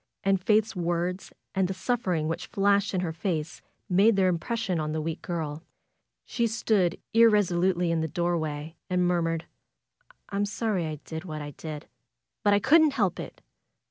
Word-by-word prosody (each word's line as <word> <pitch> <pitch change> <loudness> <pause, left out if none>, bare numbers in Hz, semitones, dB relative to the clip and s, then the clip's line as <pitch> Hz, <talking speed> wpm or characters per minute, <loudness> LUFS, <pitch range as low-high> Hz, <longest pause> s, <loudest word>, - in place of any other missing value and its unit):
And 195 -1 +2
Faith's 215 +2 +2
words 175 +1 -2 0.2
and 190 -1 +1
the 190 - -4
suffering 185 -7 -1
which 165 - -3
flashed 200 0 +2
into 185 - 0
her 165 -2 -2
face 165 -2 -3 0.3
made 200 +3 +4
their 190 -1 +3
impression 190 +1 -1
on 155 0 -2
the 160 - -1
weak 160 +1 -4
girl. 160 -3 -4 0.6
She 235 -1 0
stood 210 -5 +1 0.2
irresolutely 185 -6 +4
in 165 -1 +1
the 160 - -1
doorway 160 -2 -2
and 180 -1 +2
murmured: 165 -2 0 0.9
^M'm 205 +1 0
sorry 205 -5 -1
I 155 - -3
did 160 0 -6
what 155 -3 -5
I 145 - -6
did; 150 0 -8 0.5
but 205 - +3
I 205 - +5
couldn't 300 +6 +5
help 195 -8 0
it. - - -8
180 Hz, 165 wpm, -27 LUFS, 165-205 Hz, 0.9 s, I